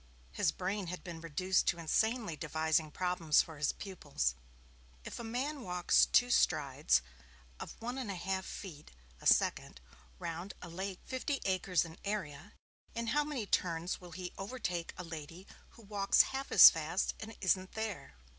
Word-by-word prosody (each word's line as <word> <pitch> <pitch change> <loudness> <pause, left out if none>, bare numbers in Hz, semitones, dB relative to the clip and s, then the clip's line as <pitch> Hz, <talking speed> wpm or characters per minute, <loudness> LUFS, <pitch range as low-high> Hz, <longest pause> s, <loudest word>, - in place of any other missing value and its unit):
His 65 - +1
brain 200 -1 -3
had 180 +2 -6
been 170 -3 -7
reduced 180 +4 +1
to 175 - +2
insanely 215 +3 0
devising 160 0 0
problems 175 -2 +2
for 160 -3 -11
his 150 - +2
pupils 145 - -2 0.7
if - - -6
a - - -5
man 260 +6 -3
walks 180 -4 +3
two 245 0 +4
strides 140 - +3 0.6
of - - -7
one 245 +3 -4
and 250 -5 -4
a 195 - -3
half 190 +2 -2
feet 165 -6 -8 0.3
a - - -2
second - - +2 0.4
round 170 +4 -5
a 175 - -9
lake 190 +2 -5
fifty 270 +2 -2
acres 185 -2 +1
in 165 0 -11
area, 190 -4 -4 0.4
in 230 0 -2
how 295 0 +3
many 290 -7 -3
turns 175 -1 -1
will 175 -2 -11
he 180 +1 -6
overtake 195 -5 -3
a 180 - -5
lady 165 +2 -8 0.3
who 230 - -14
walks 200 -1 +4
half 270 +1 -4
as - - +11
fast - - -1
and 220 0 -8
isn't 185 0 +1
there? 210 - -5
185 Hz, 165 wpm, -33 LUFS, 165-210 Hz, 0.7 s, as